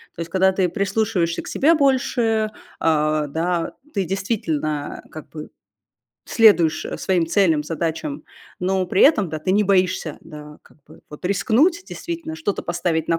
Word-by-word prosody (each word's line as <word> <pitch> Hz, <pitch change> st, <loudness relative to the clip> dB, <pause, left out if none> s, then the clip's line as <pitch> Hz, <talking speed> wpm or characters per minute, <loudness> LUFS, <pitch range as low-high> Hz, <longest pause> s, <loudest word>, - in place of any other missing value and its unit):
То -, -, -14 dB
есть 165 Hz, -, -5 dB
когда 190 Hz, +1 st, +3 dB
ты 185 Hz, -1 st, 0 dB
прислушиваешься 195 Hz, -2 st, -1 dB
к -, -, -12 dB
себе 310 Hz, +5 st, +3 dB
больше, 245 Hz, -7 st, +1 dB, 0.3 s
а, 155 Hz, -1 st, +1 dB
да, 165 Hz, +3 st, -2 dB, 0.2 s
ты 195 Hz, -2 st, 0 dB
действительно 160 Hz, -6 st, -3 dB
как 155 Hz, -, -10 dB
бы 155 Hz, -1 st, -9 dB, 0.8 s
следуешь, 190 Hz, -9 st, +4 dB
э, -, -, -5 dB
своим 180 Hz, -3 st, +1 dB
целям, 165 Hz, -4 st, +2 dB
задачам, 165 Hz, -, -4 dB, 0.4 s
но 185 Hz, 0 st, 0 dB
при 185 Hz, -, +2 dB
этом, 215 Hz, -, +5 dB
да, 155 Hz, -, -4 dB
ты 185 Hz, +5 st, -1 dB
не 210 Hz, +2 st, +3 dB
боишься, 185 Hz, -5 st, +1 dB
да, 150 Hz, -2 st, -11 dB
вот -, -, -18 dB
как -, -, -23 dB
бы 155 Hz, -, -17 dB
вот 150 Hz, +4 st, -12 dB
рискнуть, 255 Hz, -, +2 dB
действительно, 335 Hz, -2 st, -6 dB
что-то 315 Hz, -12 st, -3 dB
поставить 170 Hz, -2 st, -2 dB
на 165 Hz, -, +2 dB
185 Hz, 165 wpm, -21 LUFS, 160-220 Hz, 0.8 s, этом